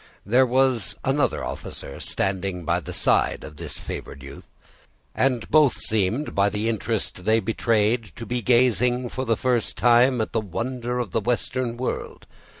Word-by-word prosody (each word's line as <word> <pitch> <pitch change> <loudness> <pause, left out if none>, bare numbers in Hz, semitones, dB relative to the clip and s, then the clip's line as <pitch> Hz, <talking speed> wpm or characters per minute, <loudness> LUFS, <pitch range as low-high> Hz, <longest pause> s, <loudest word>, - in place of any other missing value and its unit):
There 125 +6 +4
was 130 -4 +2
another 135 -1 +1
officer 70 - -6
standing 95 -2 -2
by 85 +2 +1
the - - -8
side - - +1
of 75 -1 -10
this - - -6
favored 70 - -7
youth; 70 - -11 0.7
and 130 -4 0
both 150 -4 +5
seemed, 110 +7 0
by 100 +1 +3
the 105 +2 -2
interest 110 -4 -2
they 110 +3 +3
betrayed, 115 +1 +1
to 115 - -7
be 125 +1 -2
gazing, 125 0 +2
for 130 +2 -4
the 115 -2 +1
first 125 -3 0
time, 120 +1 +4
at 110 - -1
the 115 - +1
wonder 120 +5 -3
of 120 -7 -3
the 115 - 0
western 125 +1 -1
world. 125 - -4
115 Hz, 160 wpm, -24 LUFS, 105-125 Hz, 0.7 s, both